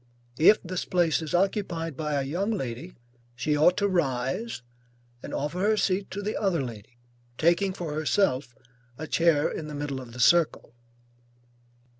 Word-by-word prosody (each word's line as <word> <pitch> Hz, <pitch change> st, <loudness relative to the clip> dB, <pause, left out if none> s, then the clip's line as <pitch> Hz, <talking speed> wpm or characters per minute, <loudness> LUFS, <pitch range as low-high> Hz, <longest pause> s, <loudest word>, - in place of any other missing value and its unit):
If 195 Hz, +7 st, +7 dB
this 185 Hz, 0 st, -3 dB
place 170 Hz, -3 st, +1 dB
is 160 Hz, +1 st, -3 dB
occupied 175 Hz, -4 st, -1 dB
by 150 Hz, +1 st, -3 dB
a 140 Hz, -, 0 dB
young 175 Hz, +10 st, -2 dB
lady, 165 Hz, -, -4 dB, 0.4 s
she 135 Hz, +5 st, 0 dB
ought 170 Hz, +5 st, +4 dB
to 205 Hz, -, +2 dB
rise 140 Hz, -, -1 dB, 0.6 s
and -, -, -8 dB
offer 150 Hz, +5 st, -3 dB
her 215 Hz, +3 st, +2 dB
seat 195 Hz, -1 st, 0 dB
to 205 Hz, +1 st, -5 dB
the 210 Hz, -, -2 dB
other 180 Hz, -8 st, 0 dB
lady, 120 Hz, 0 st, -9 dB, 0.4 s
taking 175 Hz, +4 st, +2 dB
for 170 Hz, -4 st, -5 dB
herself 150 Hz, -, 0 dB, 0.4 s
a 155 Hz, -, -5 dB
chair 160 Hz, -2 st, +3 dB
in 155 Hz, -, -5 dB
the 150 Hz, -, -7 dB
middle 145 Hz, -2 st, -4 dB
of 120 Hz, -2 st, -11 dB
the 125 Hz, -, -9 dB
circle. 165 Hz, -1 st, +3 dB
165 Hz, 160 wpm, -27 LUFS, 140-185 Hz, 0.6 s, If